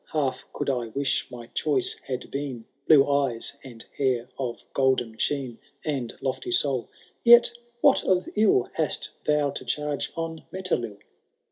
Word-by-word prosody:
Half 140 -4 -1
could - - -4
I 125 -4 0
wish 135 +5 -1
my 120 -2 -9
choice 145 -5 +2
had 130 -2 -4
been 135 -5 -4 0.2
Blue 145 -3 +7
eyes, 140 -5 +1
and 120 -4 -10
hair 125 -3 +1
of 125 -3 -4
golden 130 -4 +1
sheen, 135 -5 -1 0.3
And 135 -6 -2
lofty 130 -1 -3
soul 130 -1 +2 0.2
;— - - -35
yet 240 0 +7 0.3
what 280 - +5
of 185 -1 +2
ill 210 - +3
Hast 160 -2 +1
thou 150 -2 +2
to - - -6
charge 145 +3 -2
on 165 -1 -4
Metelill 125 - -2
135 Hz, 150 wpm, -26 LUFS, 120-150 Hz, 0.3 s, Blue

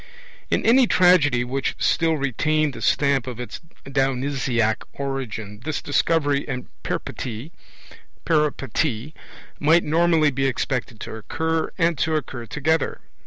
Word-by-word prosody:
In - - 0
any 245 +2 +6
tragedy 160 - +4
which 130 +2 -2
still 165 -1 +2
retained 150 +2 0
the - - -9
stamp 140 -3 +2
of 125 -2 -6
its 125 - -7 0.2
Dionysiac 130 -4 0 0.2
origin, 115 -7 -5
this 155 +1 -2
Discovery 145 -1 +1
and 125 -3 -4 0.2
Peripety 125 +5 -5 2.1
might 160 +4 +4
normally 160 -1 +3
be 135 +1 0
expected 125 -3 -2
to - - -6
occur, 160 +8 -2
and 165 -4 +1
to 160 0 +1
occur 130 -6 -4
together. 150 +3 0
140 Hz, 120 wpm, -23 LUFS, 125-160 Hz, 2.1 s, any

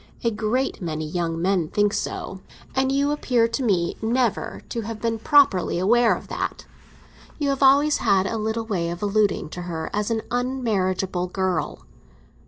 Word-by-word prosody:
A 230 - +2
great 220 +5 -1
many 155 -3 -3
young 165 0 -2
men 180 -2 +1
think 205 +4 +1
so; 190 0 -4 0.3
and 265 0 +2
you 280 +1 +1
appear 250 -5 +2
to 230 - -2
me 190 -8 +1
never 235 0 -1
to 230 - -3
have 220 0 -6
been 225 0 -1
properly 245 - +4
aware 230 +6 +4
of - - -10
that. - - -4 0.7
You 290 -2 0
have 275 0 -1
always 280 +2 +5
had 195 -3 +2
a 225 +3 -2
little 220 +1 -2
way 180 -6 -1
of 175 +3 -5
alluding 205 -5 +1
to 180 - -7
her 160 -1 -4
as 210 0 -1
an 225 -1 -1
unmarriageable 195 -8 -1
girl." 185 -3 -2
215 Hz, 170 wpm, -23 LUFS, 185-245 Hz, 0.7 s, always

